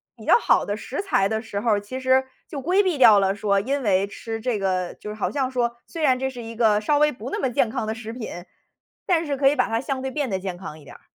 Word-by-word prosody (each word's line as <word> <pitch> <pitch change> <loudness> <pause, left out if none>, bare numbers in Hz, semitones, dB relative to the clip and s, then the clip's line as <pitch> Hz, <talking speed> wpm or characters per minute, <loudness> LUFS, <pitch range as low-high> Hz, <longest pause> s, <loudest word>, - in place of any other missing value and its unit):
比 - - -13
较 - - +6
好 - - +3
的 205 +1 -3
食 265 - -4
材 390 - +2
的 220 +1 -2
时 205 -3 -5
候 230 0 +1
儿， 205 -1 +2
其 255 +6 -6
实 260 0 +3 0.2
就 280 -3 -6
规 365 +7 +3
避 365 -6 0
掉 220 -5 +7
了 195 0 +1
说 200 -1 +1
因 270 +5 -2
为 195 -1 +2
吃 225 +2 -6
这 235 -1 -1
个 185 -2 -1
就 210 - -9
是 210 - -6
好 - - -1
像 265 -2 -1
说 240 -2 0
虽 330 - -7
然 260 -4 +4
这 265 +1 -2
是 245 -2 -8
一 230 0 -8
个 215 -3 +3
稍 290 +7 +1
微 300 0 +4
不 245 +2 -8
那 - - -3
么 265 - 0
健 235 -1 +1
康 220 - -3
的 220 - -2
食 225 -1 -7
品， 240 -2 -6 0.8
但 335 -3 +2
是 285 -2 -1
可 270 0 +3
以 290 - +4
把 - - +2
它 225 +1 -1
相 270 -1 -3
对 265 - -3
变 285 -4 -2
得 190 - -1
健 185 -1 -4
康 155 -4 -9
一 - - -16
点 - - -13
儿。 - - -17
235 Hz, 315 characters per minute, -23 LUFS, 205-270 Hz, 0.8 s, 掉